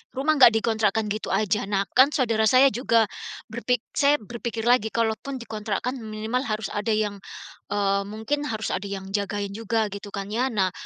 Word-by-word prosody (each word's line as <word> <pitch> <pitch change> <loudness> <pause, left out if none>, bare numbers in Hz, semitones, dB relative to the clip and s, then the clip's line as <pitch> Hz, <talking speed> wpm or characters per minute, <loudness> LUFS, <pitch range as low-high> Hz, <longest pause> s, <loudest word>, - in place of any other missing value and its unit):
rumah 290 +3 +1
enggak 235 -4 +8
dikontrakkan 220 -1 +1
gitu 215 +1 -3
aja. 210 -1 0
Nah 200 -1 +1
kan 260 +2 +6
saudara 225 -6 +2
saya 260 +3 +6
juga 230 -1 +3 0.5
berpik 240 +1 -1
saya 285 0 +3
berpikir 235 0 -5
lagi, 240 -2 +3
kalau 230 -1 +2
pun 275 -1 -6
dikontrakkan 225 +1 -4
minimal 220 +2 -3
harus 215 -2 -3
ada 215 +1 0
yang, 210 -2 -1 0.5
eee, 200 -1 +1
mungkin 245 +8 -3
harus 220 -4 -3
ada 190 +2 -3
yang 195 -1 -6
jagain 200 0 -2
juga 220 0 -1
gitu 200 +1 -7
kan 200 0 -5
ya? 245 +4 +1
Nah, 195 -6 +1
220 Hz, 175 wpm, -25 LUFS, 205-240 Hz, 0.5 s, enggak